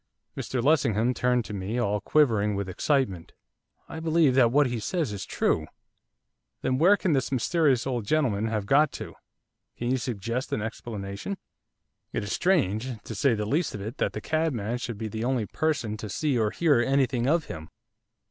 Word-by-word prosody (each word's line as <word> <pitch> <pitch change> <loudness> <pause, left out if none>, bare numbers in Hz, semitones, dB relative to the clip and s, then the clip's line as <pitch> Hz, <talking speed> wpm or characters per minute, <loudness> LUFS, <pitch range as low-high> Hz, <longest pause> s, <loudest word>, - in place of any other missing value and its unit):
Mr 125 -2 -3
Lessingham 125 -5 +3
turned 125 -2 +1
to 105 - -7
me, 100 +4 -3
all 105 -4 0
quivering 110 -7 +2
with 100 -1 -2
excitement. 95 - -1 0.5
'I 160 - -7
believe 160 -3 +3
that 125 -3 +5
what 145 +3 +4
he 120 -2 -2
says 155 - -2
is 100 -2 -6
true!' 80 - 0 1.0
'Then 130 0 +1
where 190 +6 +6
can 180 -5 +1
this 135 -2 0
mysterious 135 0 +2
old 125 -4 -1
gentleman 115 -4 +1
have 110 -2 -2
got 145 +6 +4
to, - - -7 0.6
can 120 +1 -1
you 130 - +2
suggest 120 +1 -3
an - - 0
explanation? 105 - -5 0.8
It - - -1
is 100 - -5
strange, 130 - +1
to - - -7
say 120 +3 +2
the 105 -1 -2
least 150 +7 0
of 105 - -6
it, 110 +7 -6
that - - 0
the - - -5
cabman 125 -8 -1
should 120 -3 -5
be 110 +1 -4
the 110 +1 -4
only 125 -3 0
person 140 -6 -1
to 105 0 -6
see 145 +7 0
or 110 -3 +2
hear 150 0 +3
anything 130 -1 +1
of 160 +2 +2
him. 80 -1 -8
120 Hz, 185 wpm, -27 LUFS, 105-145 Hz, 1.0 s, where